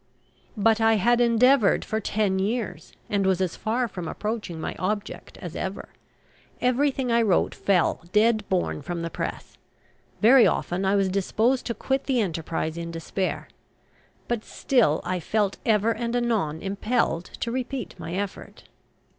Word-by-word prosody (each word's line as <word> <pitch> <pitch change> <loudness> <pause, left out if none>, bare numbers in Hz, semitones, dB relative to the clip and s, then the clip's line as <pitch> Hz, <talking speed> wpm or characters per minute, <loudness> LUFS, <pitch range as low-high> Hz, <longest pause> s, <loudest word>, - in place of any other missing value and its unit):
But 225 +2 +3
I 225 0 +5
had 240 +4 +3
endeavoured 240 0 +4
for 220 - -1
ten 200 -2 0
years, 220 +4 -3 0.2
and 200 -1 0
was 190 -1 +2
as 185 -2 -1
far 235 +4 -1
from 180 -6 -6
approaching 210 -4 -4
my - - -4
object 205 +2 -4
as - - -8
ever. - - -4 0.7
Everything 260 0 +1
I 235 0 +4
wrote 205 -6 +2
fell 190 -4 +1
dead 215 +1 +3
born 180 -5 0
from 170 +2 -4
the 170 - -4
press. - - -6 0.6
Very 240 +3 +7
often 180 +2 -1
I 195 +1 +3
was 195 -1 +2
disposed 220 +7 +1
to 235 - -2
quit 270 +5 -1
the 260 -3 +1
enterprise 165 -4 -2
in 170 0 -5
despair. 170 +3 -3 0.8
But 235 -2 -2
still 230 - +1
I 185 0 -2
felt 205 +2 -1
ever 220 0 +3
and 235 +1 -2
anon 215 -11 0
impelled 200 -3 0
to 230 - -2
repeat 255 -1 -4
my 165 +2 -5
effort. 200 0 -5
210 Hz, 155 wpm, -25 LUFS, 185-235 Hz, 0.8 s, Very